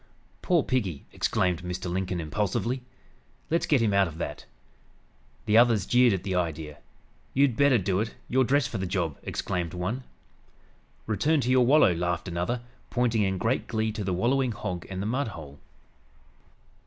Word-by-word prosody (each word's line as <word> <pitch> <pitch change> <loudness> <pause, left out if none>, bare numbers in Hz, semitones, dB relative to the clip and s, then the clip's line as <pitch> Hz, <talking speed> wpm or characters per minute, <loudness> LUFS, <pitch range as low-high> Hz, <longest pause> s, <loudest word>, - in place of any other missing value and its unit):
"Poor 175 -5 +2
piggy!" 100 - -2
exclaimed 90 -2 0
Mr. 90 +1 -4
Lincoln 90 0 -2
impulsively. 105 +9 -1 0.7
"Let's 165 - +1
get 140 -6 +3
him 105 -3 +2
out 100 -1 +4
of 80 -1 -9
that." 85 - -5 1.0
The 110 +1 +5
others 115 -5 +4
jeered 125 +1 +5
at 95 -2 -1
the 95 - -2
idea. 80 -4 -3 0.6
"You'd 135 -3 +3
better 140 -1 +4
do 95 -2 0
it. 110 +2 -3
You're 130 +1 +3
dressed 135 +1 +2
for 110 - -4
the 95 - -2
job!" 85 -5 -2
exclaimed 90 -1 -3
one. 105 +9 -3 1.0
"Return 150 +9 +1
to 125 - 0
your 130 -2 +4
wallow!" 140 - +6
laughed 85 +1 -2
another, 90 +8 -2 0.3
pointing 120 -3 +1
in 95 -2 +1
great 115 +7 0
glee 110 -1 -1
to 105 -1 -4
the 95 - -2
wallowing 120 +6 +1
hog 90 -5 -5
and 95 0 -4
the - - -3
mudhole. 105 - -4
105 Hz, 165 wpm, -27 LUFS, 90-125 Hz, 1.0 s, wallow